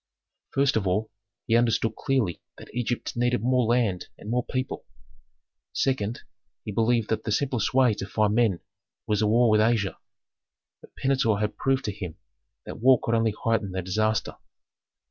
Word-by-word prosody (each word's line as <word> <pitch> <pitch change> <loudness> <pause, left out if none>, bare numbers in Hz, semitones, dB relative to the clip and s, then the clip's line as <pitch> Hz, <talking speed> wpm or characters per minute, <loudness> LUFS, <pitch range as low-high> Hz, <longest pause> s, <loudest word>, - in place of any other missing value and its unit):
First 135 -3 +3
of 100 -3 -1
all, 105 +4 0 0.3
he 115 - +2
understood 115 -1 +2
clearly 125 -10 -1 0.2
that - - -13
Egypt 120 0 -2
needed 120 0 +1
more 125 0 +2
land 115 -7 +1
and 105 - -7
more 125 +1 +1
people. 130 +1 -4 0.9
Second, 120 -4 -1 0.4
he 105 - -4
believed 115 +1 +1
that 110 - -1
the 110 - -3
simplest 125 -1 0
way 130 -4 +5
to 100 -1 -6
find 105 0 +1
men 110 -6 +2 0.4
was 105 -2 0
a 105 - +3
war 115 +1 +4
with 110 0 +4
Asia. 110 -3 +1 0.8
But - - -18
Pentuer 130 -6 +1
had 105 0 -1
proved 135 0 0
to 105 - -1
him 90 -5 -7 0.5
that - - -8
war 130 +1 +5
could 115 - -2
only 115 -2 +2
heighten 115 -4 0
the 95 -1 -3
disaster. 110 +3 -1
115 Hz, 165 wpm, -26 LUFS, 105-125 Hz, 0.9 s, way